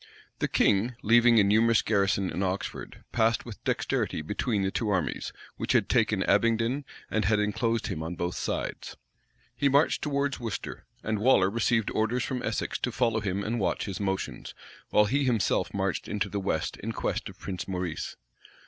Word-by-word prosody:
The -, -, +1 dB
king, 110 Hz, +5 st, +2 dB
leaving 120 Hz, +1 st, +6 dB
a -, -, +6 dB
numerous 110 Hz, +3 st, +4 dB
garrison 100 Hz, -2 st, +1 dB
in 95 Hz, -, -3 dB
Oxford, 95 Hz, 0 st, -4 dB
passed 115 Hz, -1 st, +2 dB
with 115 Hz, -6 st, -10 dB
dexterity 75 Hz, -, -1 dB
between 105 Hz, +4 st, -1 dB
the 95 Hz, -, 0 dB
two 110 Hz, +1 st, -1 dB
armies, 95 Hz, -5 st, -1 dB, 0.3 s
which -, -, -1 dB
had -, -, +2 dB
taken -, -, +2 dB
Abingdon, 115 Hz, +5 st, +2 dB, 0.3 s
and 110 Hz, -2 st, +1 dB
had 105 Hz, +1 st, +3 dB
enclosed 115 Hz, +2 st, 0 dB
him 85 Hz, -5 st, -3 dB
on 80 Hz, +2 st, -4 dB
both 85 Hz, 0 st, -2 dB
sides. -, -, -4 dB, 0.6 s
He 140 Hz, -, +2 dB
marched 140 Hz, +3 st, +3 dB
towards 140 Hz, -2 st, -1 dB
Worcester; 115 Hz, -5 st, -5 dB, 0.2 s
and 110 Hz, -1 st, -1 dB
Waller 105 Hz, -5 st, +4 dB
received 115 Hz, -1 st, +1 dB
orders 110 Hz, +3 st, 0 dB
from 125 Hz, -2 st, -3 dB
Essex 110 Hz, -, -2 dB
to 125 Hz, -, -1 dB
follow 115 Hz, -2 st, +1 dB
him 100 Hz, -1 st, -2 dB
and 115 Hz, +3 st, -1 dB
watch 95 Hz, -, 0 dB
his 100 Hz, -3 st, -5 dB
motions, 95 Hz, -1 st, -3 dB, 0.3 s
while 105 Hz, -, +5 dB
he 140 Hz, +7 st, +1 dB
himself 120 Hz, -6 st, +1 dB
marched -, -, -2 dB
into 105 Hz, -1 st, -2 dB
the 100 Hz, -, -2 dB
west, 95 Hz, -5 st, -2 dB
in -, -, -5 dB
quest -, -, -2 dB
of -, -, -13 dB
Prince 95 Hz, -2 st, -5 dB
Maurice. 90 Hz, -3 st, -3 dB
110 Hz, 175 wpm, -28 LUFS, 100-120 Hz, 0.6 s, leaving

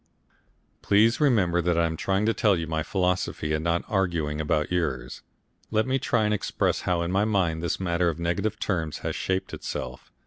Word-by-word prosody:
Please 110 Hz, +3 st, +4 dB
remember 95 Hz, -, +3 dB
that 85 Hz, 0 st, +1 dB
I 85 Hz, -, +3 dB
am 80 Hz, 0 st, -2 dB
trying 95 Hz, +5 st, 0 dB
to 115 Hz, -, +2 dB
tell 105 Hz, -3 st, +3 dB
you 85 Hz, -, -2 dB
my 80 Hz, 0 st, -2 dB
philosophy, 90 Hz, -3 st, -1 dB
and 75 Hz, 0 st, -1 dB
not 85 Hz, 0 st, +1 dB
arguing 85 Hz, -8 st, 0 dB
about 75 Hz, 0 st, 0 dB
yours. 65 Hz, -8 st, -2 dB, 0.5 s
Let 110 Hz, 0 st, +1 dB
me 130 Hz, +1 st, 0 dB
try 115 Hz, -3 st, +1 dB
and 105 Hz, -, +1 dB
express 105 Hz, -, 0 dB
how 85 Hz, -1 st, +1 dB
in 85 Hz, -, -2 dB
my 100 Hz, +2 st, +2 dB
mind 95 Hz, -7 st, +1 dB
this 85 Hz, -, -1 dB
matter 85 Hz, -1 st, +1 dB
of 80 Hz, -, -4 dB
negative 85 Hz, +6 st, -1 dB
terms 80 Hz, -6 st, -2 dB
has -, -, -1 dB
shaped 95 Hz, 0 st, -2 dB
itself. -, -, -6 dB
90 Hz, 195 wpm, -26 LUFS, 80-100 Hz, 0.5 s, Please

